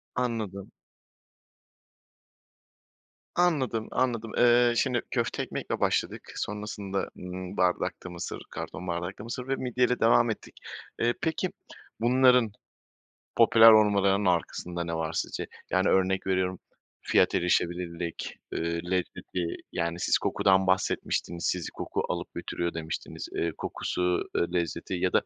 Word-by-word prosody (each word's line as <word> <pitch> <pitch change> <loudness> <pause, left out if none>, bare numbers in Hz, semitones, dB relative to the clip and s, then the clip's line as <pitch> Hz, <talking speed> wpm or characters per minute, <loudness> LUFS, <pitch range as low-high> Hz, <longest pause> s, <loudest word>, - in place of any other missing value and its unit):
Anladım. 110 -6 -3 2.6
Anladım, 135 -11 +1
anladım. 115 -3 0
Iıı, 120 0 +5
şimdi 125 -2 +2
köfte - - -1
ekmekle - - -4
başladık, - - -1
sonrasında, 105 -2 -3
ımm, 90 0 -7
bardakta 90 0 0
mısır, 85 -1 -6
karton 90 - -6
bardakta 85 +4 -3
mısır 125 +2 -5
ve 135 - +1
midyeyle 125 -1 +1
devam 115 +1 +5
ettik. 110 - -5 0.5
Iıı, 120 +1 +3
peki, 165 +3 0 0.5
bunların 125 -1 +5 0.9
popüler 115 0 +8
olmalarının 100 -2 +4
arkasında 85 0 -1
ne 85 0 -3
var 80 -1 -2
sizce? - - -3 0.2
Yani, 95 +2 +2
örnek 95 0 +2
veriyorum, 95 -1 0 0.4
fiyat - - +3
erişebilirlik, 85 -1 -1
eee, 85 +1 -2
lezzeti, 90 -1 -2 0.2
yani 85 0 -2
siz - - +3
kokudan 95 -1 +3
bahsetmiştiniz, 90 -2 0
sizi 90 -3 -1
koku - - -3
alıp - - -4
götürüyor 85 0 -3
demiştiniz. 80 -1 -5
Iıı, 85 0 0
kokusu, 90 0 -1
iii, 85 - 0
lezzeti 85 -2 -2
ya - - 0
da - - +4
95 Hz, 120 wpm, -28 LUFS, 90-115 Hz, 2.6 s, popüler